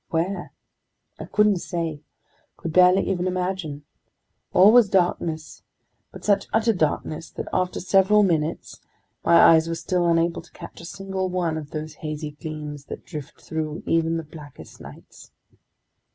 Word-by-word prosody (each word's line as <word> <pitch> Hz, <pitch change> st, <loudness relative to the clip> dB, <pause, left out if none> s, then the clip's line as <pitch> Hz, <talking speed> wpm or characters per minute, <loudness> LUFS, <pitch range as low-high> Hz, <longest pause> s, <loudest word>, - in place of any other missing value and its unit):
Where? 175 Hz, +3 st, -2 dB, 0.7 s
I -, -, -6 dB
couldn't 210 Hz, -2 st, +3 dB
say, 165 Hz, -4 st, -4 dB, 0.6 s
could 165 Hz, -, -5 dB
barely 180 Hz, +2 st, +5 dB
even 185 Hz, -1 st, -1 dB
imagine. 180 Hz, -5 st, -3 dB, 0.7 s
All 190 Hz, +3 st, +7 dB
was 235 Hz, -3 st, +6 dB
darkness, 170 Hz, -4 st, -1 dB, 0.5 s
but -, -, -11 dB
such 200 Hz, -1 st, +2 dB
utter 225 Hz, +1 st, +2 dB
darkness 155 Hz, -2 st, -2 dB
that -, -, -7 dB
after 185 Hz, 0 st, 0 dB
several 195 Hz, +3 st, +4 dB
minutes, 165 Hz, -3 st, -1 dB, 0.4 s
my 170 Hz, -, +4 dB
eyes 165 Hz, -1 st, +6 dB
were 165 Hz, -, -1 dB
still 175 Hz, +1 st, 0 dB
unable 170 Hz, 0 st, +1 dB
to 170 Hz, -, -21 dB
catch -, -, -11 dB
a -, -, -10 dB
single 190 Hz, +1 st, -4 dB
one 175 Hz, -3 st, -1 dB
of 155 Hz, -2 st, -6 dB
those 155 Hz, 0 st, -6 dB
hazy 155 Hz, -1 st, -4 dB
gleams 150 Hz, -1 st, -7 dB
that -, -, -9 dB
drift 150 Hz, -4 st, -8 dB
through 155 Hz, 0 st, -4 dB
even 165 Hz, 0 st, +1 dB
the 165 Hz, -, -4 dB
blackest 150 Hz, -2 st, -13 dB
nights. -, -, -13 dB
170 Hz, 150 wpm, -24 LUFS, 155-185 Hz, 0.7 s, All